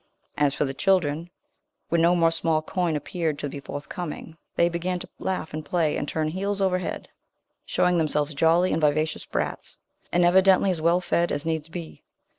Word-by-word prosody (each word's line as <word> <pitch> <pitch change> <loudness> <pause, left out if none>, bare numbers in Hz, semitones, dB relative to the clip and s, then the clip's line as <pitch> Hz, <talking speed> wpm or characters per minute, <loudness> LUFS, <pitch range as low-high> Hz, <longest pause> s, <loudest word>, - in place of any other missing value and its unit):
As 145 -1 +2
for - - +1
the 135 - -3
children, 170 -1 +1 0.6
when 170 -1 +2
no 170 +2 +4
more 165 -1 +4
small 160 -1 0
coin 175 -1 -1
appeared 160 0 -2
to 145 - -3
be 140 - -7
forthcoming, 150 +4 -7 0.2
they 170 - +4
began 175 +1 -2
to - - -9
laugh 185 -5 -3
and 155 0 -4
play, 160 -2 0
and 145 - -3
turn 155 0 -1
heels 195 +4 -2
over 190 -2 +2
head, - - -5 0.6
showing 180 -1 +2
themselves 150 -1 +1
jolly 165 +5 +3
and 160 - 0
vivacious 155 +1 +1
brats, - - -3 0.3
and 175 0 +3
evidently 190 +2 +5
as 170 -3 -3
well 170 +2 +3
fed 170 -1 +1
as 145 - -2
needs 160 -1 -2
be. 170 -1 -8
165 Hz, 185 wpm, -25 LUFS, 155-180 Hz, 0.6 s, evidently